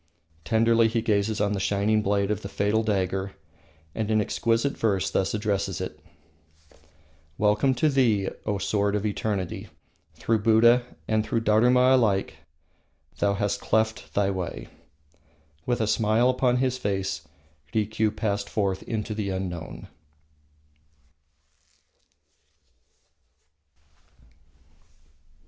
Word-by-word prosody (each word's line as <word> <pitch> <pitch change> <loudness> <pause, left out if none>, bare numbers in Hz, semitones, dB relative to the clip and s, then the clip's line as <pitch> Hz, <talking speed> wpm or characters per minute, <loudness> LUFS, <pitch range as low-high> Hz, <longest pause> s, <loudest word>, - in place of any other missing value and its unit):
Tenderly 115 +2 +3
he 115 0 -1
gazes 105 -1 0
on 105 0 +1
the 100 - -2
shining 105 +2 +1
blade 100 0 0
of 105 -1 -2
the 100 - -7
fatal 105 +3 +1
dagger, 95 -2 -1 0.6
and 110 -1 -3
in 110 -1 +3
exquisite 115 +5 0
verse 100 -4 0
thus 95 +2 0
addresses 100 -3 -1
it: 90 -5 -6 1.4
"Welcome 105 +6 +2
to 140 +6 +2
thee, 120 -9 +2 0.2
O 105 -2 0
sword 100 +1 0
of 105 0 -2
eternity! 100 -3 -3 0.5
Through 115 -1 0
Buddha 115 +3 +5 0.2
And 110 -1 +1
through 115 +1 -1
Dharuma 125 +4 +4
alike 105 -7 +1 0.8
Thou 100 0 +2
hast 100 0 -1
cleft 110 0 -1
thy 100 -1 +2
way." 95 -2 -5 1.0
With 120 -1 0
a 110 - +1
smile 110 +3 +2
upon 125 -1 +1
his 130 0 0
face 95 -6 -3 0.4
Rikiu 110 0 0
passed 100 -2 -2
forth 100 -3 -1
into 110 -1 -4
the 105 -2 -3
unknown. 95 -4 -5
105 Hz, 115 wpm, -25 LUFS, 100-115 Hz, 1.4 s, Buddha